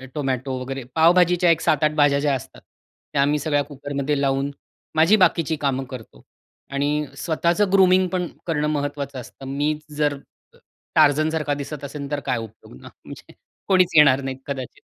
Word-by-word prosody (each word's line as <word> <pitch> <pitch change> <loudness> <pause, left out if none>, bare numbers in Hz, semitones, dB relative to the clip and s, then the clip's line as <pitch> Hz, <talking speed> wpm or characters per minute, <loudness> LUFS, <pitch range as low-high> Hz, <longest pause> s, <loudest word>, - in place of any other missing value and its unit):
Tomato 135 -2 -2
वगैरे 135 0 -5
पावभाजीच्या 175 +1 +4
एक 165 - +1
7-8 150 0 +2
भाज्या 145 -2 +3
ज्या 140 -1 +1
असतात, 125 - -9 0.5
त्या 140 - +2
आम्ही 145 +1 +2
सगळ्या 145 -2 0
कुकरमध्ये 145 0 -3
लावून 135 +1 0 0.4
माझी 165 +7 +5
बाकीची 160 -1 +2
कामं 135 -1 0
करतो. 125 -4 -10 0.5
आणि 145 +2 0
स्वतःचं 175 +5 0
ग्रूमिंग 185 -1 +5
पण 180 -2 -1 0.2
करणं 150 -2 0
महत्त्वाचं 145 -2 -3
असतं. 135 +3 -13
मी 145 +3 0 0.2
जर 145 -2 +1 0.8
टार्झन 155 +2 +4
सारखा 150 -2 -1
दिसत 145 0 -6
असेल, 140 0 -6
तर 145 - -1
काय - - 0
उपयोग 110 - -11
ना, - - -11 0.2
म्हणजे - - -12 0.3
कोणीच 185 -2 +3
येणार 140 -3 +6
नाही 135 -1 -5
कदाचित. 135 -3 -6
145 Hz, 155 wpm, -22 LUFS, 140-160 Hz, 0.8 s, येणार